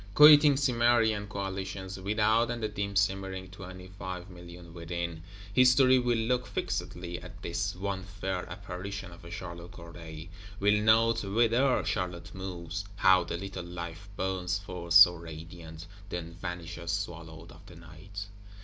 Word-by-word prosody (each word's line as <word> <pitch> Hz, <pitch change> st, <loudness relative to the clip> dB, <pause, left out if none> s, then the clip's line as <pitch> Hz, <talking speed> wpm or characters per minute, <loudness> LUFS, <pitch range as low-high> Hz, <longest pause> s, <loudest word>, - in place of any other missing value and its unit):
Quitting 150 Hz, -1 st, +9 dB
Cimmerian 120 Hz, -5 st, +2 dB
Coalitions 95 Hz, -1 st, -5 dB
without, 110 Hz, +4 st, +2 dB
and 120 Hz, -1 st, -4 dB
the -, -, +2 dB
dim 100 Hz, -1 st, -4 dB
simmering 95 Hz, -1 st, 0 dB
twenty 95 Hz, -1 st, -10 dB
five 90 Hz, +1 st, -6 dB
million 85 Hz, -1 st, -12 dB
within, 85 Hz, -1 st, -4 dB, 0.3 s
History 130 Hz, +2 st, +6 dB
will 120 Hz, -1 st, +1 dB
look 125 Hz, +2 st, 0 dB
fixedly 85 Hz, 0 st, -4 dB
at 90 Hz, +1 st, -11 dB
this 95 Hz, +3 st, -2 dB
one 95 Hz, +1 st, -3 dB
fair 95 Hz, -1 st, -4 dB
Apparition 95 Hz, +1 st, -6 dB
of 85 Hz, 0 st, -14 dB
a 85 Hz, -, -10 dB
Charlotte 85 Hz, -1 st, -8 dB
Corday; 85 Hz, -1 st, -10 dB, 0.3 s
will 105 Hz, +1 st, +3 dB
note 115 Hz, +1 st, +4 dB
whither 120 Hz, +6 st, +2 dB
Charlotte 90 Hz, -2 st, -3 dB
moves, 95 Hz, -1 st, -5 dB
how 95 Hz, -2 st, +5 dB
the 85 Hz, 0 st, -4 dB
little 95 Hz, 0 st, -6 dB
Life 85 Hz, +2 st, -7 dB
burns 95 Hz, -1 st, -1 dB
forth 90 Hz, -4 st, -4 dB
so 90 Hz, -1 st, +10 dB
radiant, 80 Hz, 0 st, -9 dB, 0.2 s
then 85 Hz, -2 st, -5 dB
vanishes 85 Hz, -1 st, -5 dB
swallowed 85 Hz, -4 st, -5 dB
of 80 Hz, -, -15 dB
the 90 Hz, -, -13 dB
Night. 85 Hz, +5 st, -9 dB
95 Hz, 140 wpm, -30 LUFS, 85-100 Hz, 0.3 s, so